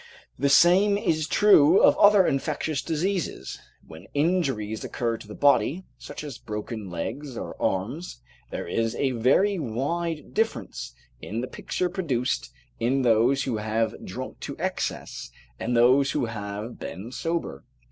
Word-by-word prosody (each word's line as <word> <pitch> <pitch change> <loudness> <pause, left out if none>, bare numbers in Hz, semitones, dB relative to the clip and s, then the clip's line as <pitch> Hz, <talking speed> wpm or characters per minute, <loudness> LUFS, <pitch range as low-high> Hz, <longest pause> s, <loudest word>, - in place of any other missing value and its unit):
The 140 +1 +2
same 180 +8 +5
is 155 -6 0
true 185 -4 +6
of - - +6
other 205 -2 +7
infectious 150 +1 -1
diseases. 165 - -2 0.3
When 80 +4 -12
injuries 140 - 0
occur 115 -2 -2
to 110 - -13
the 105 - -9
body, 145 +4 +3 0.2
such - - -8
as 140 -5 -7
broken 105 -1 -6
legs 120 - -5
or - - -6
arms, 120 - -2 0.3
there - - -5
is 115 +5 -1
a 135 -2 0
very 140 - +2
wide 150 +6 -3
difference 150 - -2 0.3
in 110 +4 -4
the 125 - -4
picture 180 - -2
produced 150 -10 -2 0.3
in 130 +3 +1
those 120 +4 +3
who 125 -5 -2
have 110 +1 -1
drunk - - -7
to - - -6
excess, - - -3 0.3
and 120 +1 0
those 130 +3 +4
who - - 0
have 105 0 -6
been 105 +6 -7
sober. 145 - -3
135 Hz, 145 wpm, -26 LUFS, 115-165 Hz, 0.3 s, other